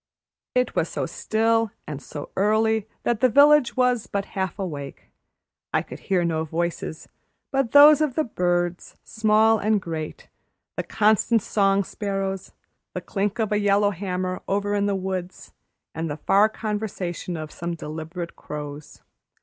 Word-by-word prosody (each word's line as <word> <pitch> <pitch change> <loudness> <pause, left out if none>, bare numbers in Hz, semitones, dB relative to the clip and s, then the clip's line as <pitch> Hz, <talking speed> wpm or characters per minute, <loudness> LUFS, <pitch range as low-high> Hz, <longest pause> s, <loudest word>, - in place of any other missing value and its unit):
It 250 0 +1
was - - +1
so - - -2
still 225 0 +1 0.2
and 145 -2 -6
so 145 0 -8
early 220 +2 +2 0.2
that 235 -3 0
the 255 - +4
village 285 +1 +5
was 250 -3 +2
but 200 -1 -2
half 190 -3 -2
awake. 150 -8 -6 0.6
I - - +2
could - - -10
hear 185 -3 0
no 160 -1 0
voices 165 0 -3 0.4
but 270 -3 +1
those 295 +1 +8
of 295 -5 0
the 315 - +2
birds, 175 - -1
small 220 0 +3
and 215 +1 +2
great, 160 -4 -6 0.5
the - - -1
constant 220 +1 +2
song 200 -1 +2
sparrows, 195 -1 -4 0.4
the - - -2
clink 205 +1 -2
of 220 -3 -1
a 210 - +2
yellow 205 0 +3
hammer 185 -1 -3
over 205 +1 0
in 205 0 +1
the 200 - +1
woods, 185 -1 -5 0.4
and 160 0 -3
the 145 - -4
far 200 +7 +4
conversation 205 -6 -4
of 155 -1 -6
some 170 0 -4
deliberate 160 +2 -6
crows. 150 0 -8
195 Hz, 150 wpm, -24 LUFS, 175-220 Hz, 0.6 s, those